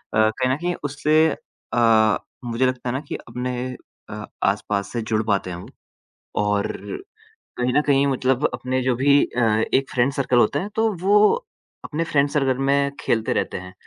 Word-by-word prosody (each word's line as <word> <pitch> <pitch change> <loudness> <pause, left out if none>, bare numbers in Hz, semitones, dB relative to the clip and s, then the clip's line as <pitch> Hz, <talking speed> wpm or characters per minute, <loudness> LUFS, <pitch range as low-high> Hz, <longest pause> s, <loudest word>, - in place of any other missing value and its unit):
कहीं 110 +4 +2
न - - +1
कहीं 175 +2 -2
उससे 150 +3 +2 0.5
अ, 110 -2 +4 0.3
मुझे 120 +2 0
लगता 125 -1 -1
है - - -1
ना 130 - -1
कि - - -4
अपने 125 0 -4 0.5
अ, 105 0 -6 0.2
आस-पास 100 0 -1
से 120 - -1
जुड़ 110 0 -1
पाते 100 -3 0
हैं 85 - -5
वो। 90 - -10 0.8
और 105 0 0 0.9
कहीं 125 0 0
न 150 - +4
कहीं 140 -1 +3
मतलब 130 +1 +1
अपने 130 0 -2
जो 125 -1 +1
भी 140 +3 +4
अ, 125 - -3 0.3
एक 135 0 +2
फ़्रेंड 125 +2 +2
सर्कल 130 -3 +1
होता 120 +5 +3
है 200 - -4
तो 225 0 +2
वो 200 +2 +4 0.7
अपने 160 +2 -2
फ़्रेंड 145 -3 +1
सर्कल 135 -4 +1
में 140 0 +2
खेलते 110 -1 0
रहते - - -2
हैं 90 0 -9
130 Hz, 175 wpm, -22 LUFS, 110-140 Hz, 0.9 s, अ